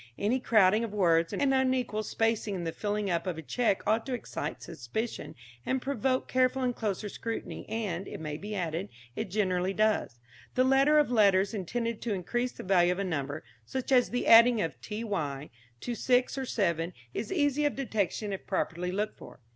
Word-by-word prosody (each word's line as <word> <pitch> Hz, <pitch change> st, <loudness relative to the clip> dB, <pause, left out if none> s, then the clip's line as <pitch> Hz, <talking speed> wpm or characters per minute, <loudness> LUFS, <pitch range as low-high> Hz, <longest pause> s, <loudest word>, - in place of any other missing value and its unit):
Any 225 Hz, +6 st, +1 dB
crowding 215 Hz, -2 st, +4 dB
of 215 Hz, -2 st, -5 dB
words 165 Hz, -4 st, +3 dB
and 275 Hz, -2 st, +1 dB
unequal 255 Hz, -4 st, +1 dB
spacing 220 Hz, -1 st, 0 dB
in 175 Hz, -, -4 dB
the 165 Hz, -, -2 dB
filling 205 Hz, +1 st, -2 dB
up 170 Hz, +2 st, -1 dB
of 175 Hz, -3 st, -2 dB
a 160 Hz, -, -6 dB
cheque 225 Hz, -, 0 dB
ought 220 Hz, +2 st, +2 dB
to 260 Hz, -, -1 dB
excite 240 Hz, -, -5 dB
suspicion 170 Hz, -, -5 dB, 0.3 s
and 260 Hz, -, 0 dB
provoke 260 Hz, 0 st, -1 dB
careful 255 Hz, +1 st, +2 dB
and 245 Hz, -1 st, 0 dB
closer 210 Hz, -1 st, -2 dB
scrutiny, 230 Hz, +3 st, -6 dB
and, 200 Hz, -5 st, -3 dB
it -, -, -7 dB
may 150 Hz, -2 st, -4 dB
be 210 Hz, +5 st, -6 dB
added, 175 Hz, +1 st, -2 dB, 0.3 s
it 220 Hz, -, -3 dB
generally 185 Hz, -2 st, 0 dB
does. 215 Hz, -, +1 dB, 0.4 s
The 255 Hz, -, +4 dB
addition 270 Hz, +3 st, +4 dB
of 300 Hz, -4 st, +4 dB
letters 200 Hz, -3 st, +4 dB
intended 230 Hz, +3 st, -3 dB
to 220 Hz, -4 st, -1 dB
increase 240 Hz, +7 st, -2 dB
the -, -, -9 dB
value 180 Hz, -2 st, +4 dB
of -, -, -8 dB
a 200 Hz, -, -1 dB
number, 145 Hz, -4 st, -3 dB, 0.2 s
such 260 Hz, 0 st, -4 dB
as 250 Hz, -2 st, +5 dB
the 245 Hz, -, -2 dB
adding 230 Hz, 0 st, +7 dB
of 165 Hz, -, -1 dB
ty 195 Hz, -11 st, -4 dB, 0.3 s
to 240 Hz, -, -3 dB
six 250 Hz, +3 st, +2 dB
or 265 Hz, -1 st, -3 dB
seven, 170 Hz, -6 st, 0 dB, 0.2 s
is -, -, -4 dB
easy 295 Hz, -4 st, +2 dB
of 290 Hz, -, +1 dB
detection 215 Hz, -5 st, -2 dB
if 190 Hz, -, -7 dB
properly 180 Hz, +1 st, -1 dB
looked 210 Hz, +3 st, -3 dB
for. -, -, -12 dB
215 Hz, 190 wpm, -29 LUFS, 185-245 Hz, 0.4 s, adding